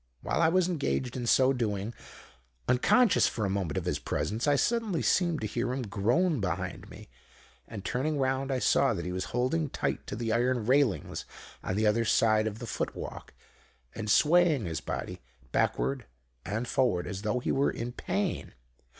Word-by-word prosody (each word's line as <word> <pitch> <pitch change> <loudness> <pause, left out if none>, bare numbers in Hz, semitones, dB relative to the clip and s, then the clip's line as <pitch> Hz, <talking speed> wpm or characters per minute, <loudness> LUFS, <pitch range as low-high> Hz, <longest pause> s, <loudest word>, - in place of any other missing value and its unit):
While - - -1
I 165 - +5
was 180 +1 +3
engaged 140 -7 -1
in 120 -2 -3
so 130 +2 +4
doing, 110 -3 -2 0.7
unconscious 215 - +4
for 110 - -2
a 95 - -1
moment 95 -6 -2
of - - -2
his - - -1
presence, 110 +7 -2
I 145 - +4
suddenly 220 - 0
seemed 170 -4 +2
to - - -2
hear 120 +4 -2
him 130 0 -2
groan 120 - +1
behind 90 -2 -3
me; - - -12 0.6
and 100 -3 -8
turning 145 +4 -1
round 135 0 0
I 130 - +1
saw 130 -1 +3
that 85 - -4
he 90 - -3
was 90 0 -3
holding 130 +6 0
tight - - -3
to - - -4
the 115 -1 -1
iron 120 -1 +1
railings 130 -3 +1 0.4
on 95 - -2
the 110 +2 +1
other 110 +2 +3
side 110 0 +3
of 110 -1 -4
the 120 - -7
foot 115 - -3
walk, - - -8 0.6
and 110 -2 -5
swaying 155 - +4
his 80 -5 -3
body 65 - -5 0.3
backward 65 +3 0 0.4
and 110 +4 -2
forward, 120 -11 +1
as 95 0 -5
though 110 +3 -1
he 125 - -1
were 140 +1 +2
in 120 +1 -4
pain. 195 +8 -3
120 Hz, 185 wpm, -29 LUFS, 105-140 Hz, 0.7 s, I